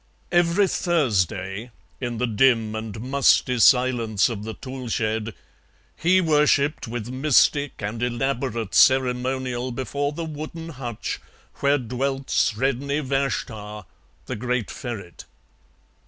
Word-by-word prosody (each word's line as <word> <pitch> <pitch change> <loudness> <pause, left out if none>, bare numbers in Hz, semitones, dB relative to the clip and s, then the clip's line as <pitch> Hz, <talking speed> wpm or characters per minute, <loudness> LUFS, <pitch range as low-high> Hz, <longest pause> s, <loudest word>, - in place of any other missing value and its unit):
Every 175 +3 +3
Thursday, 105 - 0 0.3
in 120 -2 -3
the 125 - +1
dim 115 -1 +2
and 110 -1 -5
musty 125 0 +2
silence 120 -4 +4
of 105 -3 -5
the 110 - -5
tool 130 -1 -7
shed, 110 -1 -1 0.6
he 180 +3 +3
worshipped 150 -4 +2
with 120 0 -5
mystic 140 -1 +2
and 110 +3 -4
elaborate 120 -2 -2
ceremonial 130 -1 +2
before 140 +3 -2
the 165 +2 -5
wooden 160 +2 -7
hutch 125 -7 -5 0.4
where 140 +1 +3
dwelt 135 +2 -3
Sredni 135 +5 +1
Vashtar, 110 -6 -3 0.4
the - - -4
great 125 0 -2
ferret. 105 -8 -7
125 Hz, 110 wpm, -24 LUFS, 115-140 Hz, 0.6 s, silence